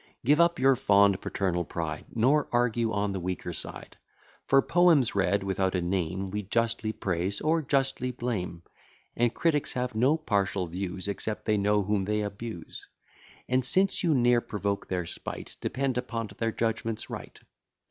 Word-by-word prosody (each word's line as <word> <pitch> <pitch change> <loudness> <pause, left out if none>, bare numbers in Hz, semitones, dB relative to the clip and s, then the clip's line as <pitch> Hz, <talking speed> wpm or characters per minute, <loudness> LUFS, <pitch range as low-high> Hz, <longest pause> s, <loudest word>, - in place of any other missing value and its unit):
Give 150 +5 +4
up 170 0 +3
your 135 +1 +4
fond 100 -6 +4
paternal 90 -3 -1
pride, 75 - -4
Nor 135 +6 +3
argue 120 -1 +1
on 100 -1 0
the 95 - -3
weaker 90 -1 -4
side: - - -8 0.5
For, 135 - +6
poems 170 -8 +4
read 100 0 +1
without 95 -1 0
a 90 - +1
name 95 +1 -2
We 105 +1 -2
justly 115 +2 0
praise, 95 -1 -1
or 160 +1 +2
justly 135 -2 0
blame; 105 -9 -4 0.5
And 120 -1 +2
critics 150 +1 0
have 125 -2 -2
no 130 +8 +3
partial 100 - 0
views, 90 +2 -4
Except 105 +1 -4
they 105 - +2
know 105 +1 +2
whom 100 -1 0
they 105 +1 0
abuse: 105 -3 -7 0.6
And 130 +1 +2
since 190 +10 +2
you 165 -4 +2
ne'er 120 -1 +4
provoke 100 -2 -3
their 90 -2 -2
spite, - - -7
Depend 130 -2 -1
upon't 115 -5 -5
their 115 0 0
judgment's 115 -1 -2
right. - - -8
110 Hz, 160 wpm, -28 LUFS, 95-125 Hz, 0.6 s, For